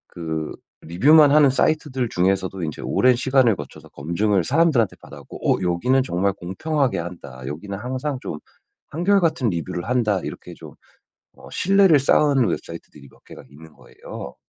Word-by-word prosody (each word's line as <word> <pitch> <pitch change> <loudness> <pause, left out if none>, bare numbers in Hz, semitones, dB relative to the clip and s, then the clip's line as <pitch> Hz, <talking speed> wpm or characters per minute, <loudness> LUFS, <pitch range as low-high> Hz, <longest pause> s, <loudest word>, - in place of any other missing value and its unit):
그 80 -2 -4 0.3
리뷰만 145 - +5
하는 145 -2 +5
사이트들 135 -2 0
중에서도 95 -1 -1
인제 75 -3 -5
오랜 125 0 +3
시간을 130 -3 +2
거쳐서 75 -5 -11
검증을 90 +6 -1
사람들한테 135 - +2
받았고 - - -3
'어, - - -9
여기는 125 +10 +1
정말 100 -3 -1
공평하게 100 - -2
한다, 85 -7 -9
여기는 85 +8 -6
항상 130 +4 -4
좀 75 - -6 0.5
한결같은 170 - +1
리뷰를 85 0 -4
한다.' 115 -5 0
이렇게 - - -8
좀, - - -13 0.6
어 - - -15
신뢰를 190 -5 +4
쌓은 140 -2 +3
웹사이트들이 75 -5 -7
몇 - - -25
개가 - - -13
있는 80 +2 -16
거예요. - - -11
110 Hz, 355 characters per minute, -21 LUFS, 85-140 Hz, 0.6 s, 리뷰만